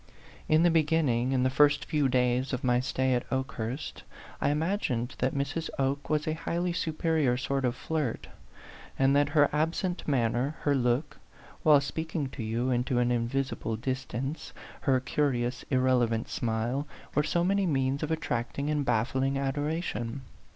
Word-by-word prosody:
In 155 Hz, +1 st, +5 dB
the 175 Hz, -, +5 dB
beginning, 150 Hz, -6 st, +2 dB
in 130 Hz, -1 st, +2 dB
the 130 Hz, -, +2 dB
first 145 Hz, +2 st, +4 dB
few 145 Hz, -3 st, +1 dB
days 125 Hz, +1 st, +1 dB
of 125 Hz, -, -2 dB
my 125 Hz, -1 st, +3 dB
stay 130 Hz, 0 st, 0 dB
at 125 Hz, -, +1 dB
Okehurst, 130 Hz, 0 st, -3 dB, 0.4 s
I -, -, +2 dB
imagined 150 Hz, -, -1 dB
that 130 Hz, +2 st, 0 dB
Mrs. 140 Hz, +4 st, -2 dB
Oke 140 Hz, +1 st, -1 dB
was 155 Hz, 0 st, 0 dB
a 155 Hz, -, +1 dB
highly 170 Hz, +2 st, -2 dB
superior 160 Hz, -6 st, +1 dB
sort 135 Hz, +1 st, -1 dB
of 120 Hz, 0 st, 0 dB
flirt; 150 Hz, -3 st, -2 dB, 0.7 s
and 135 Hz, +1 st, +4 dB
that 145 Hz, 0 st, +3 dB
her 145 Hz, -1 st, +7 dB
absent 165 Hz, +4 st, -1 dB
manner, 125 Hz, +1 st, +1 dB
her 145 Hz, -, +2 dB
look, 130 Hz, +3 st, 0 dB, 0.4 s
while 150 Hz, -2 st, +6 dB
speaking 160 Hz, 0 st, -3 dB
to 130 Hz, -, -7 dB
you, 115 Hz, +4 st, -1 dB
into 125 Hz, +1 st, 0 dB
an 120 Hz, 0 st, +2 dB
invisible 120 Hz, -1 st, -1 dB
distance, 130 Hz, +4 st, -4 dB, 0.3 s
her 130 Hz, -2 st, +2 dB
curious 125 Hz, -1 st, -1 dB
irrelevant 125 Hz, -4 st, +2 dB
smile, 120 Hz, +5 st, -1 dB, 0.3 s
were -, -, +3 dB
so 170 Hz, +3 st, 0 dB
many 195 Hz, +1 st, +2 dB
means 135 Hz, -2 st, 0 dB
of 155 Hz, -, -2 dB
attracting 140 Hz, -2 st, -2 dB
and 150 Hz, -1 st, +1 dB
baffling 130 Hz, +3 st, +1 dB
adoration. 140 Hz, -3 st, -2 dB
135 Hz, 155 wpm, -29 LUFS, 125-150 Hz, 0.7 s, her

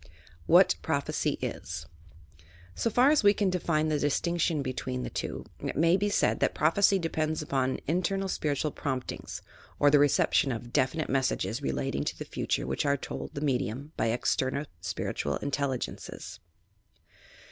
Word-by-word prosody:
WHAT 180 Hz, +3 st, +7 dB
PBOPHECY 140 Hz, -4 st, -1 dB
IS -, -, -4 dB, 0.9 s
So 230 Hz, -, 0 dB
far 250 Hz, +5 st, +5 dB
as 305 Hz, -, +4 dB
we 205 Hz, 0 st, +6 dB
can 195 Hz, -2 st, +1 dB
define 160 Hz, -3 st, +1 dB
the 150 Hz, -1 st, +1 dB
distinction 165 Hz, +1 st, +1 dB
between 130 Hz, -1 st, -3 dB
the -, -, -5 dB
two, -, -, -4 dB, 0.2 s
it -, -, -3 dB
may 165 Hz, +4 st, +4 dB
be 205 Hz, +2 st, +1 dB
said 205 Hz, -, +2 dB
that -, -, +1 dB
prophecy 195 Hz, +6 st, +4 dB
depends 155 Hz, -3 st, -1 dB
upon 130 Hz, -3 st, 0 dB
in 170 Hz, +5 st, +2 dB
ternal 195 Hz, +2 st, -1 dB
spiritual 150 Hz, -4 st, -1 dB
promptings, 130 Hz, -3 st, -4 dB, 0.3 s
or 145 Hz, -, +5 dB
the 145 Hz, -, +6 dB
reception 145 Hz, -1 st, +3 dB
of 120 Hz, 0 st, -6 dB
definite 140 Hz, +5 st, +1 dB
messages 135 Hz, -1 st, 0 dB
relating 65 Hz, 0 st, -1 dB
to -, -, -3 dB
the -, -, -6 dB
future -, -, -2 dB
which 65 Hz, +1 st, -1 dB
are 140 Hz, -1 st, +2 dB
told -, -, -6 dB
the 140 Hz, -, -4 dB
me 135 Hz, -4 st, +2 dB
dium 135 Hz, +8 st, -5 dB
by -, -, 0 dB
external 130 Hz, +4 st, 0 dB, 0.2 s
spiritual 70 Hz, -3 st, -2 dB
intelligences. 140 Hz, -2 st, -4 dB
145 Hz, 160 wpm, -29 LUFS, 130-170 Hz, 0.9 s, WHAT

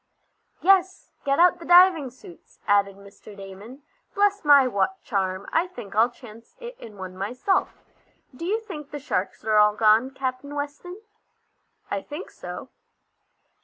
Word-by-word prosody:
"Yes, 375 Hz, 0 st, +2 dB
get 275 Hz, 0 st, +1 dB
out 355 Hz, +1 st, +4 dB
the 335 Hz, -, -10 dB
diving 350 Hz, -5 st, +6 dB
suits," 240 Hz, -9 st, -17 dB
added 200 Hz, -1 st, +2 dB
Mr. 200 Hz, +1 st, -15 dB
Damon. 200 Hz, +8 st, -11 dB, 0.3 s
"Bless 405 Hz, 0 st, +2 dB
my 285 Hz, -3 st, +6 dB
watch 245 Hz, -, 0 dB
charm, 190 Hz, -3 st, -2 dB
I 335 Hz, +3 st, +2 dB
think 240 Hz, -, -10 dB
I'll 225 Hz, +3 st, +4 dB
chance 230 Hz, -2 st, -15 dB
it 485 Hz, +1 st, -9 dB
in 215 Hz, -3 st, -12 dB
one 185 Hz, -1 st, -8 dB
myself! 250 Hz, -, -2 dB, 0.5 s
Do 295 Hz, -, -9 dB
you 410 Hz, +6 st, 0 dB
think 310 Hz, -10 st, -9 dB
the 295 Hz, -, -6 dB
sharks 210 Hz, -8 st, -3 dB
are 215 Hz, -1 st, +2 dB
all 210 Hz, 0 st, +5 dB
gone, 220 Hz, +4 st, +4 dB
Captain 265 Hz, +1 st, -5 dB
Weston?" 295 Hz, +8 st, -6 dB, 0.9 s
"I 200 Hz, -, -1 dB
think 295 Hz, -, -9 dB
so." -, -, -9 dB
255 Hz, 150 wpm, -24 LUFS, 205-345 Hz, 0.9 s, diving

